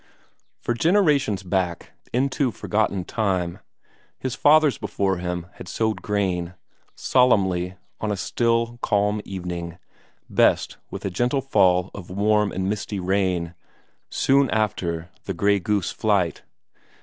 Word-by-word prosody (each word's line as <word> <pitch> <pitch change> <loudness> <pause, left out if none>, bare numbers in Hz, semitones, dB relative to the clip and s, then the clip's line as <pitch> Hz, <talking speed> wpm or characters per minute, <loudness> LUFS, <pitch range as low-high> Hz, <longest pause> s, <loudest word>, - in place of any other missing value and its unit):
For 120 - -1
generations 145 - +2
back, 90 -2 -2 0.2
into 130 +2 +1
forgotten 105 -4 -1
time, 95 -6 -1 0.6
his 130 -2 -3
fathers 150 -3 +4
before 95 -2 -1
him 90 -1 -3
had - - -9
sowed 110 +4 -1
corn; 95 -4 -1 0.4
solemnly, 95 -8 +2 0.2
on 110 - -2
a 100 - -1
still, 115 +4 0
calm 105 0 +1
evening, 90 -3 -5 0.5
best - - +2
with - - -7
a 95 - -1
gentle 125 +8 +1
fall 95 -8 +3
of 95 -4 -9
warm 105 +2 +2
and 95 0 -2
misty 105 0 -3
rain, 90 -2 0 0.6
soon 135 -1 +3
after 90 -6 -1
the 95 - -3
grey 100 +2 +3
goose 100 0 0
flight. 100 -6 0
100 Hz, 125 wpm, -23 LUFS, 90-115 Hz, 0.6 s, fathers